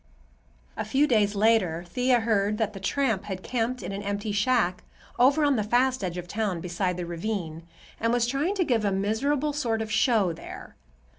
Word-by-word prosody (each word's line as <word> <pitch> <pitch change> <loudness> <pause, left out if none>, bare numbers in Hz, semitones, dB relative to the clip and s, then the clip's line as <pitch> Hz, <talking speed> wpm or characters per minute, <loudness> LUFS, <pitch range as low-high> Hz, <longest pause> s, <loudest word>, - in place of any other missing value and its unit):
A - - -3
few 270 +7 +2
days 215 -6 +2
later 200 -6 +2
Thea 250 +6 +2
heard 210 -2 +1
that 215 -2 -1
the 195 - -8
tramp 220 -1 0
had 190 -2 -5
camped 250 +1 -2
in - - -4
an 200 +1 -4
empty 205 +1 -3
shack 205 -3 +1 0.4
over 280 +5 +5
on 285 -3 +3
the 240 +5 +3
east 255 -4 -4
edge 180 -1 -3
of 175 0 -6
town, 200 -2 -2
beside 180 +1 -2
the 175 - -3
ravine, 170 -2 -4 0.3
and 230 +1 +1
was 240 -1 +2
trying 280 +10 -1
to 380 - +2
give 235 -6 +1
a 200 - +1
miserable 260 +10 0
sort 240 -6 -1
of 220 0 -4
show 220 -5 +2
there. - - -10
220 Hz, 195 wpm, -26 LUFS, 195-250 Hz, 0.4 s, over